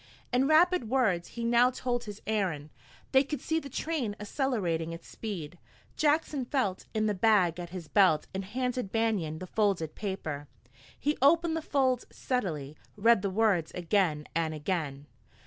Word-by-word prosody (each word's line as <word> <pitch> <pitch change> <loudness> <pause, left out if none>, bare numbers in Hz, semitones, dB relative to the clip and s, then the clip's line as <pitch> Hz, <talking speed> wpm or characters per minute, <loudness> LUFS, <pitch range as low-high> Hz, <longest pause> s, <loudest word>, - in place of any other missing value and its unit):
In 255 +2 +3
rapid 320 -4 +4
words 215 -10 +2
he 235 - -2
now 240 +1 +5
told 245 -1 -2
his 210 -1 -9
errand. 180 -9 -1 0.4
They 265 +1 +6
could 290 0 -4
see 320 +5 0
the 280 - -9
train 265 -7 -2
accelerating 205 - -1
its 165 - -10
speed. 175 -7 -6 0.4
Jackson 300 -2 +1
felt 240 -8 -1
in 215 0 +2
the 210 - +1
bag 185 -4 +3
at 175 -1 -6
his 180 -2 -7
belt 185 -7 +4
and 190 +1 -3
handed 250 +1 -2
Banion 210 -9 0
the 185 - -6
folded 190 -5 0
paper. 160 -8 -4 0.5
He 295 +1 0
opened 330 +4 +4
the 325 - -1
folds 260 -4 +1
steadily, 155 - -3 0.2
read 225 0 +5
the 200 - -1
words 190 -5 +2
again 170 -4 +1
and 160 0 0
again. 150 -3 -3
210 Hz, 160 wpm, -29 LUFS, 170-255 Hz, 0.5 s, They